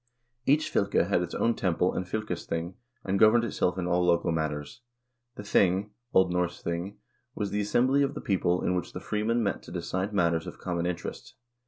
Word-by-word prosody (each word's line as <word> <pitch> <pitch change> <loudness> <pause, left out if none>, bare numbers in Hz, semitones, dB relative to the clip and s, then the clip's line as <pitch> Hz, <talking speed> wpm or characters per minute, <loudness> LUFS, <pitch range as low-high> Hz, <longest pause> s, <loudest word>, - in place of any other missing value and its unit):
Each 155 +2 +3
fylke 100 -3 +2
had 100 -3 +2
its 90 - -4
own 115 - +2
temple 90 -3 +1
and 90 - -3
fylkesthing, 90 -4 -3 0.3
and 95 +1 0
governed 110 +2 +6
itself 95 -5 0
in 90 - -2
all 90 0 +2
local 85 -1 +2
matters. 75 +3 -3 0.5
The 105 - -7
thing 100 0 +2 0.2
(O. 95 - +8
N. - - -5 0.2
J>ing) 85 +3 -4 0.4
was 105 -2 -2
the 105 - 0
assembly 125 +7 +2
of 140 0 0
the - - -4
people 90 -2 +1
in 90 - +1
which 90 -1 -3
the - - -5
freemen 115 +3 0
met 100 -3 -1
to - - -12
decide 95 +3 -2
matters 85 -4 +1
of - - -8
common 85 -1 -2
interest. 90 -1 -5
95 Hz, 190 wpm, -28 LUFS, 85-105 Hz, 0.5 s, O